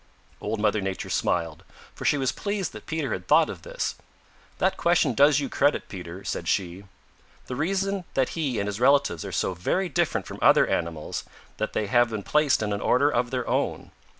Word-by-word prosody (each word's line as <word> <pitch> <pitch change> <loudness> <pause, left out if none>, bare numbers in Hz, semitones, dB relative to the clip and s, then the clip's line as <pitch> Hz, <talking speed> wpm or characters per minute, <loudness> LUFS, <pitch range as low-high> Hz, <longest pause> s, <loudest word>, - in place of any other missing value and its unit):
Old 110 - -2
Mother 105 0 +2
Nature 95 -1 -4
smiled, 85 -2 -1 0.3
for - - -8
she 145 - +3
was 130 -2 +1
pleased 200 -2 -3
that - - -11
Peter 155 -7 -2
had 90 -1 -6
thought 160 +1 +5
of - - -9
this. - - -3 0.6
"That - - +1
question 170 -6 +2
does 145 +4 +5
you 140 - -2
credit, 145 +2 +1
Peter," 90 0 -8
said - - -4
she. 95 +1 -1 0.6
"The 125 - -5
reason 195 +7 0
is - - -11
that 130 -2 +2
he 145 -8 -2
and 100 - -1
his 105 +1 -4
relatives 135 - +3
are - - -6
so 95 - 0
very 175 - -1
different 150 - 0
from - - -8
other - - +6
animals 80 -2 -3 0.3
that 110 - -3
they 110 - 0
have 120 +3 +3
been 110 -2 -4
placed 150 -3 +2
in 105 -1 -1
an 100 - -3
order 140 +4 +3
of 120 -1 0
their 125 -1 -3
own. - - -1
125 Hz, 205 wpm, -26 LUFS, 100-150 Hz, 0.6 s, other